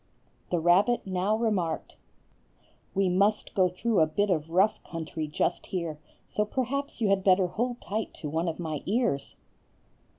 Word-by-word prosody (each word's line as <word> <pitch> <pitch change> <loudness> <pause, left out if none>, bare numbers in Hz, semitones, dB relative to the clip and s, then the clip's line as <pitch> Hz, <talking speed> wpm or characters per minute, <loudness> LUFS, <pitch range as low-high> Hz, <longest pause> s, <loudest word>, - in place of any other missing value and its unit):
The 175 - +1
rabbit 185 +9 +3
now 190 +2 +1
remarked,— 195 -8 -1 1.0
"We 195 0 +3
must 200 +4 +2
go 185 -2 +3
through 205 +3 0
a 160 - +5
bit 205 +6 0
of 160 -2 0
rough 190 +5 +2
country 160 -1 -5
just 155 +3 -1
here, 170 -5 -3 0.3
so 210 - -1
perhaps 265 +5 -3
you 215 - +3
had 195 -1 +2
better 190 -1 +5
hold 240 +7 -2
tight 215 +2 -3
to 155 - -6
one 160 +4 -1
of 165 - -2
my 155 -4 -3
ears." 210 - 0
185 Hz, 160 wpm, -28 LUFS, 165-215 Hz, 1.0 s, a